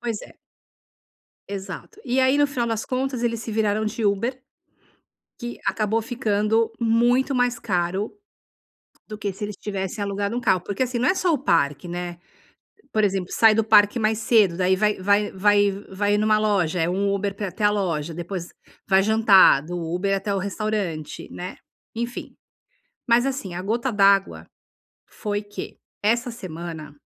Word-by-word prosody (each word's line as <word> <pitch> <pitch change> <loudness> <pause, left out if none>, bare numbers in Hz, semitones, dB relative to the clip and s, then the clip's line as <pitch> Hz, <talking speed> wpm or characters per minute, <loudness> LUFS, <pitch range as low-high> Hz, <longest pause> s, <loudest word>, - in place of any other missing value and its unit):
Pois 230 -3 -3
é. - - -14 1.1
Exato. 195 -2 -7
E 255 +1 0
aí 260 +2 +4
no 290 - +4
final 250 -4 -2
das 225 -1 -2
contas 255 -1 -2
eles 230 -1 -1
se 225 - -6
viraram 215 0 +1
de 215 +1 -3
Uber, 230 +6 0 1.0
que 240 -1 -6
acabou 220 +1 0
ficando 225 -1 0
muito 240 +4 +2
mais 245 -1 +1
caro 190 -1 -1 1.0
do 215 -1 -7
que 205 -2 -3
se 200 +3 -6
eles 205 -1 -6
tivessem 200 0 -4
alugado 200 +3 -2
um - - -1
carro. 185 -6 +2
Porque 200 +7 -3
assim, 245 -1 -3
não 250 - +2
é 370 - +3
só 365 -2 +1
o 300 - +1
parque, 155 - +1
né. 175 0 -5 0.7
Por 215 -1 +2
exemplo, 190 -2 -1
sai 220 -1 +5
do 225 - +3
parque 210 +1 +5
mais 220 0 +1
cedo, 215 -6 +3
daí 185 0 +2
vai 210 +2 +2
vai 200 +2 +2
vai 205 +1 +3 0.2
vai 205 +2 +1
numa 215 0 +3
loja, 190 -6 +1
é 165 - +1
um 200 +2 0
Uber 200 0 -2
para 205 +1 -4
ir - - -3
até 210 - -4
a 205 - +6
loja, 170 -6 -2
depois 175 +1 -5 0.4
vai 190 0 +5
jantar, 210 -8 +6
do 175 +3 -6
Uber 180 +4 -1
até 200 +1 -2
o - - 0
restaurante, 200 -5 -3
né, 180 +1 -7 0.4
enfim. 235 +2 -5 0.7
Mas 240 +2 +4
assim, 260 -10 -3
a 180 - -4
gota 235 +5 -1
d'água 195 -1 +3 0.6
foi 205 -1 -4
que, 205 0 -8 0.2
essa 235 +4 +1
semana, 165 -8 -8
205 Hz, 170 wpm, -23 LUFS, 190-230 Hz, 1.1 s, a